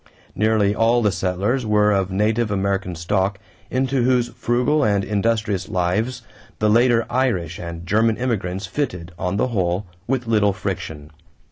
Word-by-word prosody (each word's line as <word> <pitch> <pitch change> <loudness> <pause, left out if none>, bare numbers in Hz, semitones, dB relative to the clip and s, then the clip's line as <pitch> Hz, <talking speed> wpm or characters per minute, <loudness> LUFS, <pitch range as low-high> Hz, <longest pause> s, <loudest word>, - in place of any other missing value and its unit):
Nearly 110 -1 +2
all 115 +2 +2
the 105 - +3
settlers 100 +7 -1
were 105 -1 +3
of 95 -2 +1
native 105 +4 +1
American 95 -2 -1
stock 95 +4 0 0.3
into 130 0 0
whose 125 -1 +2
frugal 125 +6 +1
and 100 -3 +2
industrious 105 -2 -1
lives 105 +8 -1 0.3
the 105 0 +2
later 115 0 +4
Irish 95 - -1
and 85 -1 -7
German 110 +4 +2
immigrants 100 -6 -2
fitted, 90 - -3
on 90 +1 -1
the 130 - +1
whole, 95 -3 -1 0.2
with 130 -1 -1
little 105 -3 +2
friction. 80 -7 -5
105 Hz, 145 wpm, -21 LUFS, 95-120 Hz, 0.3 s, later